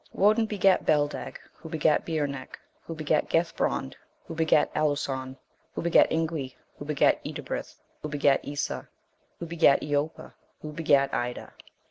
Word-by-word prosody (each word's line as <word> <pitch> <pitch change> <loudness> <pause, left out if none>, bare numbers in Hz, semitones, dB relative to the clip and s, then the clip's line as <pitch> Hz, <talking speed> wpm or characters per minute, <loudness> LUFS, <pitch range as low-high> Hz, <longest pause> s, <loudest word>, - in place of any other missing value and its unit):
Woden 215 +3 +3
begat 195 -3 +3
Beldeg, 145 -1 0
who 160 - -12
begat 155 -1 +1
Beornec, 145 -5 -3 0.3
who 165 - -5
begat 155 -1 0
Gethbrond, 165 - 0 0.3
who - - -7
begat 160 -2 +2
Aluson, 135 -3 -1 0.4
who - - -3
begat 170 - +5
Ingwi, 160 -5 -2 0.2
who 145 - -7
begat 150 -1 +2
Edibrith, - - -5 0.3
who 150 - -5
begat 145 -1 +2
Esa, 145 0 -4 0.5
who 170 - -6
begat 165 -4 +4
Eoppa, 145 +1 -2 0.3
who 155 - -6
begat 145 -3 +2
Ida. 120 0 -3
150 Hz, 135 wpm, -27 LUFS, 140-165 Hz, 0.5 s, begat